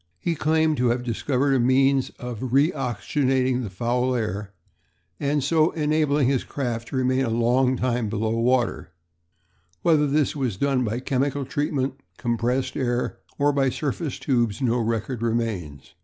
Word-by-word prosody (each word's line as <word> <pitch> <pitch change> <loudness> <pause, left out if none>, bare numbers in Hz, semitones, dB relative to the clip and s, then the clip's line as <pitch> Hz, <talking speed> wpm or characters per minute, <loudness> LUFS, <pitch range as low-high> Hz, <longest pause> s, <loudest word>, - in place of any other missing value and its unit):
He 170 - -1
claims 160 -1 +1
to 125 - +3
have 120 +1 0
discovered 130 +3 0
a 135 - +3
means 135 +2 +3
of 125 0 -5
re 145 +5 +4
oxygenating 130 - 0
the 110 - -4
foul 120 +6 0
air 105 -3 -3 0.7
and 145 0 0
so 155 +3 +3
enabling 150 -3 +1
his 135 -2 +1
craft 120 -4 -4
to - - -6
remain 130 0 +2
a 125 - -1
long 125 +3 +2
time 120 -3 0
below 110 +1 -1
water; 120 +2 0 0.9
whether 155 -3 +4
this 145 +1 +1
was 125 -9 -2
done 135 +1 +1
by 115 +2 -2
chemical 140 +1 -1
treatment, 135 -1 -2 0.2
compressed 125 +2 -1
air, 120 -2 -1 0.2
or 145 0 +2
by 135 -1 +2
surface 140 +2 -3
tubes 120 -6 0
no 125 -2 +1
record 115 +1 -2
remains. 110 - -3
130 Hz, 155 wpm, -24 LUFS, 120-140 Hz, 0.9 s, re